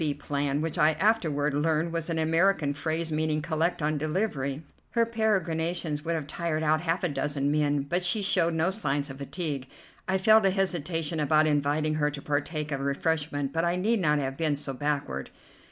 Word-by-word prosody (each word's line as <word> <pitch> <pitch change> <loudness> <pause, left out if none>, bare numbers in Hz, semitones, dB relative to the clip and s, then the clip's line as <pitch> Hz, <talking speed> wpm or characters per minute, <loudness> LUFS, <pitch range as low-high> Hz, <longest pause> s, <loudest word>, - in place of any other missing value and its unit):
D." 145 -2 0
plan, 145 0 -2
which 165 +2 -2
I 155 0 +5
afterward 155 -6 +1
learned 160 +3 0
was 165 0 -3
an 165 - -1
American 165 -1 +2
phrase 160 +3 -2
meaning, 155 0 0
"Collect 160 +1 -1
on 150 0 0
delivery." 150 -3 -2 0.3
Her 235 -1 +3
peregrinations 170 -8 -1
would 165 0 -1
have 155 -3 -3
tired 160 +1 -2
out 155 0 +2
half 175 +2 -1
a - - +3
dozen 145 -2 -1
men, 145 -1 +1
but 175 +6 -1
she 190 +4 +1
showed 170 -3 +2
no 160 +4 +2
signs 145 -8 -1
of 135 - -10
fatigue. 140 -2 -3 0.4
I 190 0 +2
felt 215 +1 +5
a - - +4
hesitation 170 -4 -1
about 155 +1 +3
inviting 150 +1 +1
her 150 - +3
to 145 -1 -6
partake 150 +1 -2
of 140 - -1
refreshment, 145 0 -1
but 165 0 0
I 170 +1 +1
need 215 +5 +1
not 150 -4 +2
have 135 -1 -2
been 155 -3 +1
so 140 -1 -4
backward. 140 - -2
155 Hz, 190 wpm, -27 LUFS, 145-170 Hz, 0.4 s, I